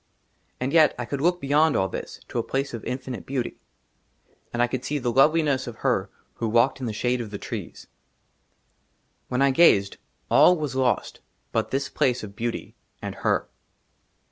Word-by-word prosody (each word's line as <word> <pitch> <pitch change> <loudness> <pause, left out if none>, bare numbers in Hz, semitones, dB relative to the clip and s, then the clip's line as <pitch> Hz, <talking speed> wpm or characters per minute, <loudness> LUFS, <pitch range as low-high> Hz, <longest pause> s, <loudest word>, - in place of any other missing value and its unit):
AND 130 +3 -2
YET 155 -3 +5
I 120 - -3
COULD 140 +3 -4
LOOK 175 +3 +2
BEYOND 150 +1 +3
ALL 95 - +2
THIS, - - -7
TO 120 - -3
A - - 0
PLACE 135 +2 -2
OF 115 - -6
INFINITE 125 -1 -5
BEAUTY; 130 -3 -3 0.9
AND 120 - -4
I 120 - +5
COULD 125 +1 -4
SEE 145 +2 -1
THE 125 -3 -1
LOVELINESS 140 0 +3
OF 120 - -6
HER - - 0 0.3
WHO 115 - -1
WALKED 120 +5 +3
IN 130 - -4
THE 110 - -3
SHADE 120 +3 0
OF 115 - -6
THE 100 - -5
TREES. - - -7 1.4
WHEN 125 +2 +1
I 140 - +4
GAZED, 105 -10 +4 0.3
ALL 180 - +6
WAS 150 -4 -3
LOST 130 -2 0 0.3
BUT - - 0
THIS 135 +1 -1
PLACE 125 -5 0
OF 100 -2 -9
BEAUTY 120 +1 -4 0.3
AND - - -5
HER. - - +1
130 Hz, 180 wpm, -25 LUFS, 120-140 Hz, 1.4 s, ALL